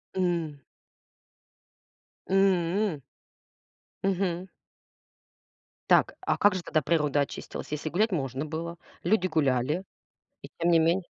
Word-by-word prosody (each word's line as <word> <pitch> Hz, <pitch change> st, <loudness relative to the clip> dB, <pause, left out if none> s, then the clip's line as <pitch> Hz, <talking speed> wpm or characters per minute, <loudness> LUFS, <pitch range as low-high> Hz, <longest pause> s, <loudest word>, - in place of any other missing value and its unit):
М. 170 Hz, -5 st, -1 dB, 1.7 s
М. 190 Hz, -3 st, +2 dB, 1.0 s
Мгм. 185 Hz, -1 st, 0 dB, 1.4 s
Так, -, -, +4 dB
а -, -, 0 dB
как 205 Hz, -1 st, +5 dB
же 185 Hz, -, -2 dB
тогда 155 Hz, -3 st, 0 dB
природа 150 Hz, -2 st, +2 dB
очистилась, 140 Hz, -, -5 dB
если 150 Hz, +1 st, -3 dB
гулять 210 Hz, +7 st, +1 dB
можно 135 Hz, -3 st, -2 dB
было? 165 Hz, +2 st, -5 dB, 0.2 s
Люди 210 Hz, -4 st, +2 dB
гуляли, 150 Hz, 0 st, +1 dB, 0.6 s
и -, -, -9 dB
тем 170 Hz, +1 st, +2 dB
не 165 Hz, -, +6 dB
менее 170 Hz, +3 st, +2 dB
170 Hz, 105 wpm, -28 LUFS, 150-185 Hz, 1.7 s, не